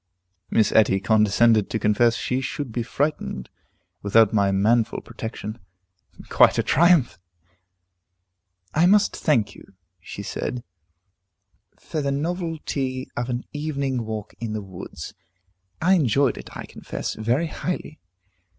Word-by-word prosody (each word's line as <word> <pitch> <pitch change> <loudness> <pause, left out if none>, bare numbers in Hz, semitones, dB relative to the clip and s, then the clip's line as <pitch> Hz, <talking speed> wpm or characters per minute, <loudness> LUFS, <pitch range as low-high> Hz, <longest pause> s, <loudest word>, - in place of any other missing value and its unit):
Miss 110 -2 +3
Etty 100 -3 +4
condescended 110 +2 +3
to - - -1
confess 110 +2 +3
she 125 +2 -1
should 130 -1 -4
be 120 - -2
frightened 115 - -2 0.5
without 105 +1 +4
my 100 -2 +3
manful 110 +4 +2
protection. 110 -1 -7 0.7
Quite - - +5
a - - +2
triumph! 165 - +3 1.5
"I 165 +3 +4
must 205 +2 +4
thank 130 -10 +1
you," - - -17 0.2
she - - -8
said, 125 -1 -4 1.2
"for 155 - -4
the 140 -1 -1
novelty 150 -4 -3
of 120 +1 -3
an 125 0 -2
evening 140 -4 -2
walk 110 -1 -6
in 115 -2 -4
the 105 -1 -4
woods. 95 -2 -9 0.7
I 185 +3 +5
enjoy 140 - +3
it, - - -8
I - - -6
confess, - - -6
very 120 +9 0
highly. 160 -1 -5
120 Hz, 125 wpm, -23 LUFS, 110-145 Hz, 1.5 s, Quite